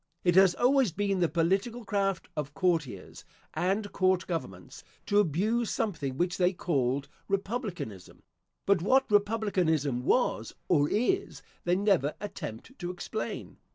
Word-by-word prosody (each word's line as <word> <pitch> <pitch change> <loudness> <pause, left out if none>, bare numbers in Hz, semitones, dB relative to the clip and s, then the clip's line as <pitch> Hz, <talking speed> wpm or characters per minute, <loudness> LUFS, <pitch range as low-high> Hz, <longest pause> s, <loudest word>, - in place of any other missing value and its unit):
It 175 - +3
has 190 0 +6
always 255 -4 +3
been 195 +2 -1
the 170 -2 +2
political 195 +8 0
craft 195 -4 -1
of 150 -1 -4
courtiers 160 - -1 0.3
and 200 +3 -1
court 185 -1 +2
governments, 95 - -6 0.2
to 205 - +3
abuse 210 +7 +1
something 145 -11 -2
which 175 +2 0
they 180 +1 +3
called 140 -6 0 0.2
republicanism; 195 - -4 0.4
but 200 -3 +3
what 260 +6 +3
republicanism 185 - +1
was, 250 - +1
or 145 -4 +3
is, 250 - 0 0.2
they 175 +1 +3
never 190 -7 +2
attempt 205 - -7
to 175 - -4
explain. 180 +4 -5
185 Hz, 130 wpm, -29 LUFS, 160-205 Hz, 0.4 s, has